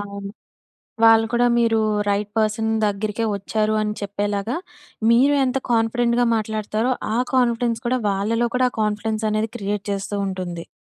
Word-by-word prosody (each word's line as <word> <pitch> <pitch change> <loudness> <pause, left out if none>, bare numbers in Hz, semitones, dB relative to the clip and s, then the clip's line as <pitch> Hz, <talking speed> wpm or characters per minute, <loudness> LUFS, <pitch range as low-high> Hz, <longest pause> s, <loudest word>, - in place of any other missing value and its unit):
అవును. 200 -1 -7 0.7
వాళ్ళు 225 0 +6
కూడా 240 +1 +3
మీరు 230 -1 +3 0.3
రైట్ 205 +1 0
పర్సన్ 220 +1 +1
దగ్గరికే 210 +2 -1
వచ్చారు 215 +2 -1
అని 210 0 -1
చెప్పేలాగా, 205 +4 -2 0.5
మీరే 270 +5 +5
ఎంత 255 +1 0
కాన్ఫిడెంట్‌గా 235 +1 +2
మాట్లాడతారో, 220 +3 -1 0.2
ఆ - - +1 0.2
కాన్ఫిడెన్స్ 235 -2 +1
కూడా, 255 +1 +1
వాళ్ళలో 225 +5 0
కూడా 255 0 +3
ఆ - - -23
కాన్ఫిడెన్సనేది 215 +1 -1
క్రియేట్ 205 0 -3
చేస్తూ 200 +1 -3
ఉంటుంది. 180 -3 -5
215 Hz, 135 wpm, -22 LUFS, 205-235 Hz, 0.7 s, వాళ్ళు